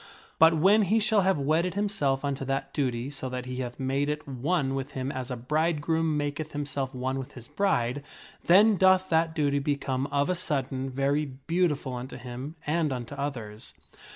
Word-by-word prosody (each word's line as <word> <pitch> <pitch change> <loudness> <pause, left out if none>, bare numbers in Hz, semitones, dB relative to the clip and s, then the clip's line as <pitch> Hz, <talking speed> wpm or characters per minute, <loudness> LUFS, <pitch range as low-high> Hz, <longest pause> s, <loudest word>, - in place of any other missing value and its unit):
But 160 +1 +7
when 200 +7 +5
he 210 +5 +2
shall 220 -1 +3
have 190 -1 +2
wedded 160 +6 +1
himself 145 -10 0
unto 140 -1 -2
that 135 0 -2
duty 130 -2 -1
so 135 -2 -5
that 125 0 -4
he 125 0 -5
hath 125 0 -5
made 135 +2 0
it 150 0 -3
one 135 +2 0
with 135 +1 -4
him 130 +1 -3
as 130 -1 -5
a 125 - -2
bridegroom 155 +4 0
maketh 145 +1 -3
himself 140 -2 -3
one 130 +1 -2
with 130 - -7
his 120 -2 -11
bride, 140 -9 0 0.4
then 205 +4 +6
doth 185 0 +4
that 160 0 +2
duty 145 -3 +1
become 140 -2 -1
of 140 0 +1
a 185 - +1
sudden 135 -6 -2
very 140 +3 0
beautiful 140 0 -1
unto 125 +1 -6
him 130 +5 -7
and 155 0 +1
unto 125 +1 -5
others. 120 -7 -5
140 Hz, 180 wpm, -27 LUFS, 130-160 Hz, 0.4 s, But